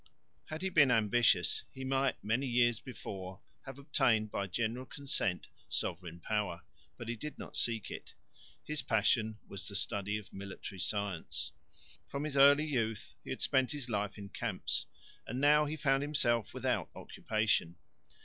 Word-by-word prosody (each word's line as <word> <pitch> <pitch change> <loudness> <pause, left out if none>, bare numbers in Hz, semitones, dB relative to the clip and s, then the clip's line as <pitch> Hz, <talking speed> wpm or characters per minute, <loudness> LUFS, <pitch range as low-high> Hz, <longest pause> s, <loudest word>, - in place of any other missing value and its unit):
Had 155 +3 -6
he 190 - +1
been 145 -6 +6
ambitious, 115 0 +4
he 130 - -8
might 135 0 +1
many 120 +6 +1
years 120 -2 +3
before 95 -6 -7 0.3
have 135 0 -7
obtained 120 -7 +2
by 100 - -1
general 115 +6 -2
consent 140 -11 -1 0.2
sovereign 85 -1 -2
power, 100 -3 -2 0.3
but 120 - -7
he 120 - -2
did 150 +7 -7
not - - -8
seek 115 -3 0
it. - - -8 0.5
His 150 -2 -2
passion 110 -1 +2
was 100 +2 -5
the 100 - -6
study 100 +1 0
of 105 - -11
military 95 0 -7
science. 100 -3 -1 0.6
From 140 +1 -3
his 150 -2 -3
early 140 +2 +7
youth 115 -7 -1
he - - -10
had - - -3
spent 130 +1 +2
his 140 -4 -5
life 105 -2 -1
in 100 -1 -8
camps, - - -2 0.4
and 125 +3 -3
now 150 +2 +6
he 150 +1 -2
found 135 -2 +2
himself 120 -7 +1
without - - -1
occupation. 110 -6 0
115 Hz, 160 wpm, -33 LUFS, 100-135 Hz, 0.6 s, early